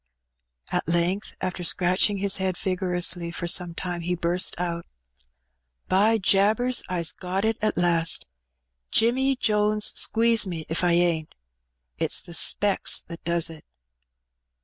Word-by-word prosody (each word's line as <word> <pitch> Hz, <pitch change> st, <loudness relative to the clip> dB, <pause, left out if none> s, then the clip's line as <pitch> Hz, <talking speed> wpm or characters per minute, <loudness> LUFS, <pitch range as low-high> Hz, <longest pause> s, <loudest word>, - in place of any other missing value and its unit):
At -, -, -2 dB
length, 175 Hz, +4 st, -1 dB
after 185 Hz, -1 st, -4 dB
scratching 185 Hz, +4 st, +2 dB
his 200 Hz, 0 st, 0 dB
head 190 Hz, -2 st, -2 dB
vigorously 180 Hz, -2 st, -1 dB
for 175 Hz, +1 st, -5 dB
some 170 Hz, 0 st, 0 dB
time^ 175 Hz, -1 st, -4 dB
he 175 Hz, +1 st, -2 dB
burst 175 Hz, +1 st, 0 dB
out 170 Hz, -1 st, -4 dB, 0.3 s
— 60 Hz, 0 st, -42 dB
'' -, -, -53 dB, 0.2 s
By 210 Hz, +4 st, +3 dB
jabers! 215 Hz, +5 st, +3 dB
I's 170 Hz, -3 st, 0 dB
got 190 Hz, +3 st, -3 dB
it 225 Hz, 0 st, -1 dB
at 215 Hz, -, 0 dB
last! 170 Hz, -2 st, +1 dB, 0.3 s
— -, -, -55 dB, 0.3 s
Jimmy 260 Hz, +4 st, +3 dB
Jones 210 Hz, -3 st, +1 dB
squeeze 230 Hz, -2 st, +3 dB
me 165 Hz, -4 st, -5 dB
if 160 Hz, +3 st, 0 dB
I 175 Hz, -1 st, +3 dB
ain^t! 170 Hz, -3 st, +1 dB, 0.7 s
It^s -, -, +1 dB
the 170 Hz, -, -11 dB
specks 200 Hz, +4 st, +1 dB
that 170 Hz, 0 st, -9 dB
does 170 Hz, 0 st, +1 dB
it.' 160 Hz, -2 st, -13 dB
180 Hz, 150 wpm, -25 LUFS, 170-205 Hz, 0.7 s, By